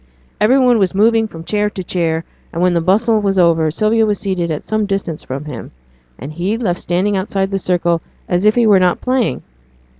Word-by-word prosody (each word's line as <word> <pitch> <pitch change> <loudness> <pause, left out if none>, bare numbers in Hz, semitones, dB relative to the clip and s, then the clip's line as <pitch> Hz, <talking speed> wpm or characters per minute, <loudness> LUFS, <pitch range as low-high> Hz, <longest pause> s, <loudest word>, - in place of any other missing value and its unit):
Every 220 +6 +4
one 250 -3 +4
was 190 -1 0
moving 225 +2 +3
from 165 -5 -10
chair 210 +3 0
to 190 -3 -7
chair, 165 -2 -1 0.3
and 165 - -5
when 180 0 +2
the 170 - +1
bustle 215 +6 +2
was 195 -1 0
over 165 -3 +3
Sylvia 215 +7 +1
was 210 -2 +1
seated 185 -4 -2
at 155 -2 -4
some 215 -1 -1
distance 195 -5 -3
from 135 +3 -6
him, 140 -6 -8 0.5
and 140 +6 -8
he 185 +7 -2
left 190 -7 -2
standing 185 +4 0
outside 195 0 -2
the 195 - -1
circle, 170 -2 0 0.3
as 180 +3 +1
if 215 - +4
he 240 -1 +3
were 205 -3 +5
not 180 -1 +2
playing. 255 -2 -1
190 Hz, 210 wpm, -16 LUFS, 170-215 Hz, 0.5 s, were